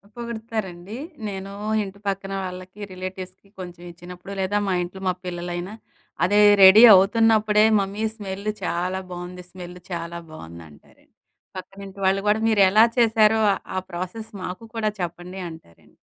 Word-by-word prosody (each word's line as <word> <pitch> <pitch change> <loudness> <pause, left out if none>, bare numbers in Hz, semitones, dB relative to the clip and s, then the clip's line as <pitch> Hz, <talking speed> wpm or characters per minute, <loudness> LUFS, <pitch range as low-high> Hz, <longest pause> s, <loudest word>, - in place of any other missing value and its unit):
పొగుడుతారండి. 220 -4 -6 0.3
నేను 195 0 -6 0.3
ఇంటి 200 0 -10
పక్కన 195 0 -3
వాళ్ళకి, 185 +2 -8
రిలేటివ్స్‌కి 185 +1 -8
కొంచెం 175 -1 -9
ఇచ్చినప్పుడు. 180 +3 -11
లేదా 195 +2 0
మా 190 - +1
ఇంట్లో 190 +2 -9
మా - - +1
పిల్లలైనా 175 +2 -5 0.5
అదే 205 +3 +3 0.2
రెడీ 200 +5 +9
అవుతున్నప్పుడే 215 +2 +4 0.2
"మమ్మీ 200 +2 -3
స్మెల్ 200 -1 -7 0.2
చాలా 180 +2 -2
బాగుంది! 180 0 -8
స్మెల్ 180 -1 -10
చాలా 170 0 -5
బాగుంది" 85 - -11
అంటారండి. 75 - -22 0.4
పక్కనింటి 195 +1 -10
వాళ్ళు 195 +1 +2
కూడా 210 +1 +3
"మీరు 215 -2 +3
ఎలా 215 +3 +6
చేశారో, 220 -1 +4 0.3
ఆ - - -1
ప్రాసెస్ 200 +6 -6
మాకు 185 +5 -6
కూడా 215 -1 0
చెప్పండి" 175 +2 -6
అంటారండి. 120 - -16
190 Hz, 135 wpm, -23 LUFS, 180-210 Hz, 0.5 s, రెడీ